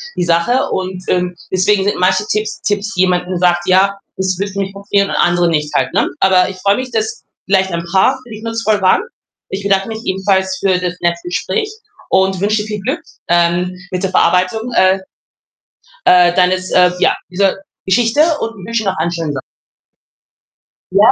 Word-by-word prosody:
die 180 Hz, -, 0 dB
Sache 175 Hz, +10 st, +1 dB
und, 185 Hz, -1 st, -3 dB
ähm, 180 Hz, -1 st, 0 dB, 0.2 s
deswegen 190 Hz, +1 st, +2 dB
sind 205 Hz, -, 0 dB
manche 185 Hz, +3 st, +2 dB
Tipps 215 Hz, 0 st, -2 dB
Tipps 205 Hz, -1 st, -2 dB
jemand, 180 Hz, -1 st, +2 dB
hm, 185 Hz, -, -2 dB
sagt: 175 Hz, -1 st, +1 dB
„Ja, 195 Hz, +2 st, +3 dB, 0.2 s
das 185 Hz, -1 st, -1 dB
wird 200 Hz, 0 st, -3 dB
nicht 195 Hz, -1 st, -3 dB
passieren“ 200 Hz, 0 st, 0 dB
und -, -, -2 dB
andere 175 Hz, -1 st, +2 dB
nicht 150 Hz, -2 st, -1 dB
halt, -, -, 0 dB
ne? -, -, +1 dB
Aber 185 Hz, -1 st, +4 dB
ich 190 Hz, -, -8 dB
freue 200 Hz, +2 st, +1 dB
mich, 255 Hz, -1 st, -5 dB
dass 220 Hz, +1 st, -3 dB, 0.2 s
vielleicht 190 Hz, -1 st, +1 dB
ein 170 Hz, 0 st, -3 dB
paar 195 Hz, +8 st, +3 dB
für 245 Hz, -, -17 dB
dich 220 Hz, 0 st, -9 dB
nutzvoll 225 Hz, -2 st, 0 dB
waren. 185 Hz, -, +4 dB, 0.5 s
Ich 195 Hz, +1 st, -5 dB
bedanke 195 Hz, +1 st, +1 dB
mich 220 Hz, +1 st, -7 dB
ebenfalls 190 Hz, 0 st, 0 dB
für 190 Hz, -2 st, +1 dB
das 180 Hz, -1 st, -2 dB
nette 170 Hz, 0 st, 0 dB
Gespräch 300 Hz, -, -2 dB, 0.4 s
und 190 Hz, 0 st, +2 dB
wünsche 210 Hz, +2 st, +1 dB
dir 210 Hz, -, -7 dB
viel 210 Hz, -1 st, -4 dB
Glück, 270 Hz, -, -2 dB, 0.3 s
ähm, 175 Hz, +1 st, +1 dB, 0.2 s
mit 185 Hz, +1 st, -3 dB
der 190 Hz, -, -1 dB
Verarbeitung, 185 Hz, +6 st, +1 dB
äh, 190 Hz, -1 st, +4 dB, 1.1 s
äh, 175 Hz, -1 st, +6 dB
deines 185 Hz, 0 st, +1 dB
äh, 180 Hz, -1 st, +5 dB
ja, -, -, +3 dB, 0.2 s
dieser 190 Hz, +1 st, +1 dB, 0.3 s
Geschichte 230 Hz, +7 st, +2 dB, 0.2 s
und 225 Hz, -5 st, -5 dB
wünsche 230 Hz, -1 st, -1 dB
noch 190 Hz, -1 st, -1 dB
einen 170 Hz, +2 st, -1 dB
schönen 165 Hz, -3 st, -3 dB
So 140 Hz, -, -4 dB, 1.5 s
Ja? -, -, +6 dB
190 Hz, 185 wpm, -16 LUFS, 180-205 Hz, 1.5 s, äh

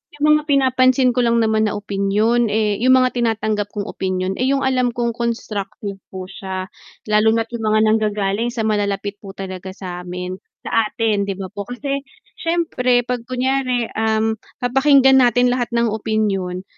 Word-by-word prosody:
'yung 300 Hz, +1 st, +3 dB
mga 300 Hz, -, -11 dB
pinapansin 260 Hz, -2 st, +3 dB
ko 250 Hz, -, -1 dB
lang 235 Hz, -1 st, +3 dB
naman 220 Hz, 0 st, +2 dB
na 210 Hz, -, -2 dB
opinyon, 205 Hz, +4 st, +1 dB
eh 210 Hz, -1 st, 0 dB
'yung 255 Hz, +1 st, +6 dB
mga 255 Hz, -1 st, +3 dB
tinatanggap 215 Hz, -3 st, 0 dB
kong 205 Hz, 0 st, -3 dB
opinyon, 185 Hz, 0 st, -3 dB
eh, 255 Hz, -, +1 dB
'yung 275 Hz, 0 st, +1 dB
alam 255 Hz, -2 st, +2 dB
kong 235 Hz, -1 st, 0 dB
constructive 210 Hz, -4 st, -4 dB
po 190 Hz, -1 st, -7 dB
siya. 190 Hz, 0 st, -6 dB, 0.3 s
Lalo 215 Hz, +1 st, +3 dB
na't 225 Hz, +1 st, -2 dB
'yung 225 Hz, -2 st, -3 dB
mga 215 Hz, 0 st, +3 dB
nanggagaling 215 Hz, 0 st, +1 dB
sa 235 Hz, -2 st, -3 dB
malalapit 205 Hz, -1 st, -1 dB
po 195 Hz, -1 st, -11 dB
talaga 190 Hz, -1 st, -6 dB
sa'min 180 Hz, 0 st, -6 dB, 0.2 s
sa 225 Hz, -1 st, +1 dB
atin 215 Hz, -3 st, 0 dB
'di 195 Hz, -, -2 dB
ba 190 Hz, -, -4 dB
po, 205 Hz, -1 st, -6 dB
kasi 275 Hz, +3 st, -3 dB, 0.4 s
siyempre 255 Hz, -8 st, +1 dB
'pag 250 Hz, -2 st, -2 dB
kunyari, 255 Hz, -1 st, 0 dB
um, 220 Hz, 0 st, +1 dB, 0.3 s
papakinggan 270 Hz, +1 st, +5 dB
natin 245 Hz, 0 st, +4 dB
lahat 245 Hz, -1 st, -1 dB
ng 235 Hz, 0 st, +2 dB
opinyon, 200 Hz, -4 st, -1 dB
220 Hz, 165 wpm, -20 LUFS, 200-250 Hz, 0.4 s, yung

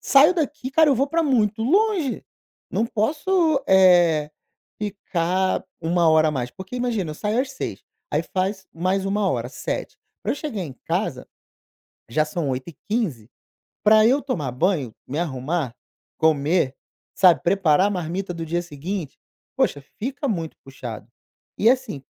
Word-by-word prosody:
saio 290 Hz, +6 st, +6 dB
daqui, 295 Hz, -5 st, -2 dB
cara, 315 Hz, +3 st, +5 dB
eu -, -, +4 dB
vou 270 Hz, +3 st, +1 dB
pra 330 Hz, +3 st, +1 dB
muito 225 Hz, -7 st, +1 dB
longe. 370 Hz, -, +1 dB, 0.5 s
Não 225 Hz, -, 0 dB
posso, 305 Hz, -, +1 dB
eh, 175 Hz, -5 st, +5 dB, 0.5 s
ficar 190 Hz, -2 st, -1 dB, 0.2 s
1 170 Hz, 0 st, +2 dB
hora 160 Hz, 0 st, +5 dB
a -, -, +1 dB
mais, 125 Hz, -4 st, -3 dB
porque 190 Hz, -, -8 dB
imagina, 230 Hz, -9 st, -1 dB
eu -, -, -6 dB
saio 210 Hz, +8 st, 0 dB
às 265 Hz, 0 st, -3 dB
18h, 265 Hz, -, -5 dB, 0.3 s
aí -, -, +2 dB
faz 190 Hz, 0 st, -2 dB
mais 185 Hz, +3 st, 0 dB
1 200 Hz, 0 st, +1 dB
hora, 120 Hz, -1 st, -2 dB
19h. -, -, -5 dB, 0.3 s
Pra -, -, 0 dB
eu -, -, -5 dB
chegar 285 Hz, -9 st, -4 dB
em 150 Hz, -, -6 dB
casa, -, -, -2 dB, 0.8 s
já 155 Hz, +6 st, +2 dB
são 155 Hz, -1 st, -3 dB
20:15. 140 Hz, -, -3 dB, 0.6 s
Pra 215 Hz, +1 st, +6 dB
eu 275 Hz, +4 st, +3 dB
tomar 165 Hz, -, -2 dB
banho, 145 Hz, -, 0 dB
me 145 Hz, +5 st, -4 dB
arrumar, 145 Hz, -3 st, -2 dB, 0.4 s
comer, 155 Hz, -2 st, +2 dB, 0.4 s
sabe, 175 Hz, -7 st, +5 dB
preparar 180 Hz, -1 st, +3 dB
a -, -, -3 dB
marmita 180 Hz, 0 st, -3 dB
do 165 Hz, -1 st, -4 dB
dia 170 Hz, +2 st, -1 dB
seguinte, 170 Hz, +1 st, -5 dB, 0.4 s
puxa, 145 Hz, -, +1 dB, 0.2 s
fica 275 Hz, +5 st, -3 dB
muito 165 Hz, -8 st, -3 dB
puxado." 120 Hz, -5 st, -8 dB, 0.5 s
E 225 Hz, -, +5 dB
assim 245 Hz, -, -1 dB
185 Hz, 150 wpm, -23 LUFS, 155-235 Hz, 0.8 s, saio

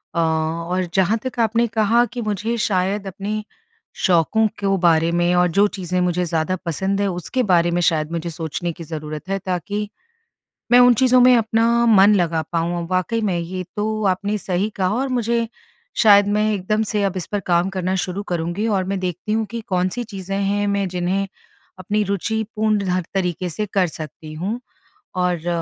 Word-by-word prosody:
अ -, -, +1 dB
और 165 Hz, +3 st, 0 dB
जहाँ 195 Hz, +3 st, +3 dB
तक 255 Hz, -1 st, -5 dB
आपने 230 Hz, +1 st, +2 dB
कहा 225 Hz, +1 st, +3 dB
कि 245 Hz, -, -3 dB
मुझे 215 Hz, +2 st, -2 dB
शायद 195 Hz, +1 st, 0 dB
अपने 205 Hz, +3 st, -4 dB, 0.6 s
शौकों 190 Hz, +5 st, +3 dB
को 195 Hz, -1 st, +2 dB
बारे 170 Hz, -2 st, +3 dB
में 175 Hz, +1 st, +2 dB
और 180 Hz, 0 st, +4 dB
जो 205 Hz, +1 st, +6 dB
चीज़ें 180 Hz, -2 st, -3 dB
मुझे 180 Hz, 0 st, +1 dB
ज़्यादा 165 Hz, +2 st, -1 dB
पसंद 190 Hz, +4 st, -1 dB
है 200 Hz, -, +1 dB
उसके 180 Hz, +9 st, -2 dB
बारे 175 Hz, -1 st, +4 dB
में 175 Hz, -, +1 dB
शायद 160 Hz, -2 st, +1 dB
मुझे 170 Hz, 0 st, -3 dB
सोचने 170 Hz, +2 st, -4 dB
की 170 Hz, -, -9 dB
ज़रूरत 155 Hz, +1 st, -7 dB
है 195 Hz, -, 0 dB
ताकि 200 Hz, +3 st, -2 dB, 0.8 s
मैं 245 Hz, -, +8 dB
उन 245 Hz, 0 st, +7 dB
चीज़ों 255 Hz, +2 st, +4 dB
में 250 Hz, 0 st, +7 dB
अपना 230 Hz, +1 st, +2 dB
मन 210 Hz, -2 st, +6 dB
लगा 170 Hz, -4 st, +1 dB
पाऊँ। 170 Hz, +1 st, -1 dB
अ, -, -, -5 dB
वाक़ई 185 Hz, +5 st, 0 dB
में 190 Hz, -5 st, 0 dB
ये 185 Hz, +2 st, -4 dB
तो 215 Hz, +1 st, -1 dB
आपने 200 Hz, +2 st, 0 dB
सही 190 Hz, +2 st, -1 dB
कहा 185 Hz, -2 st, +1 dB
और 265 Hz, +3 st, 0 dB
मुझे 235 Hz, 0 st, 0 dB, 0.5 s
शायद 205 Hz, -2 st, +6 dB
मैं 210 Hz, +1 st, +1 dB
एकदम 210 Hz, +2 st, 0 dB
से 210 Hz, -1 st, -1 dB
अब 195 Hz, -1 st, -1 dB
इस 180 Hz, -, -4 dB
पर 205 Hz, -, 0 dB
काम 175 Hz, -1 st, +1 dB
करना 185 Hz, 0 st, -1 dB
शुरू 190 Hz, +2 st, -3 dB
करूँगी 175 Hz, +4 st, -1 dB
और 200 Hz, -4 st, +1 dB
मैं 195 Hz, 0 st, -2 dB
देखती 180 Hz, +3 st, -4 dB
हूँ 220 Hz, 0 st, +1 dB
कि 235 Hz, -1 st, -4 dB
कौन-सी 185 Hz, +5 st, -1 dB
चीज़ें 195 Hz, -3 st, -5 dB
हैं 200 Hz, +1 st, 0 dB
मैं 200 Hz, -1 st, 0 dB
जिन्हें 185 Hz, +2 st, -1 dB, 0.5 s
अपनी 205 Hz, +3 st, -1 dB
रूचिपूर्ण 215 Hz, +1 st, -1 dB
हर 180 Hz, -1 st, 0 dB
तरीके 180 Hz, -2 st, -1 dB
से 210 Hz, +6 st, -3 dB
कर 190 Hz, -3 st, +3 dB
सकती 155 Hz, 0 st, -9 dB
हूँ। 195 Hz, +10 st, -3 dB, 0.6 s
और 180 Hz, -2 st, 0 dB
190 Hz, 185 wpm, -21 LUFS, 175-215 Hz, 0.8 s, मैं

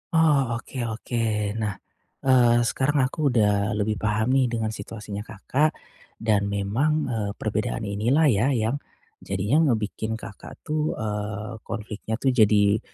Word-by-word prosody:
Oh 145 Hz, -7 st, +3 dB
oke 125 Hz, +3 st, -7 dB
oke. 115 Hz, +1 st, -3 dB, 0.4 s
Nah, 105 Hz, -3 st, -1 dB, 0.5 s
eee, 120 Hz, -2 st, +5 dB
sekarang 135 Hz, +3 st, +1 dB
aku 145 Hz, +3 st, 0 dB
udah 105 Hz, -3 st, +2 dB
lebih 105 Hz, 0 st, -1 dB
paham 110 Hz, +3 st, +1 dB
nih 135 Hz, -1 st, +4 dB
dengan 115 Hz, -2 st, -2 dB
situasinya 105 Hz, -1 st, -7 dB
Kakak, 120 Hz, +8 st, -1 dB, 0.4 s
dan 105 Hz, -3 st, +1 dB
memang, 100 Hz, +9 st, 0 dB, 0.2 s
eee, 105 Hz, -3 st, -1 dB
perbedaan -, -, -2 dB
inilah 115 Hz, +10 st, +1 dB
ya 105 Hz, +5 st, +2 dB
yang 115 Hz, +5 st, 0 dB, 0.4 s
jadinya 105 Hz, -, +1 dB
ngebikin 110 Hz, -1 st, -1 dB
Kakak 110 Hz, -2 st, -10 dB
tuh, 155 Hz, 0 st, -1 dB
eee, 105 Hz, +1 st, -4 dB
konfliknya 110 Hz, 0 st, -4 dB
tuh 130 Hz, +3 st, +1 dB
jadi 105 Hz, -3 st, +4 dB
110 Hz, 135 wpm, -25 LUFS, 105-130 Hz, 0.5 s, eee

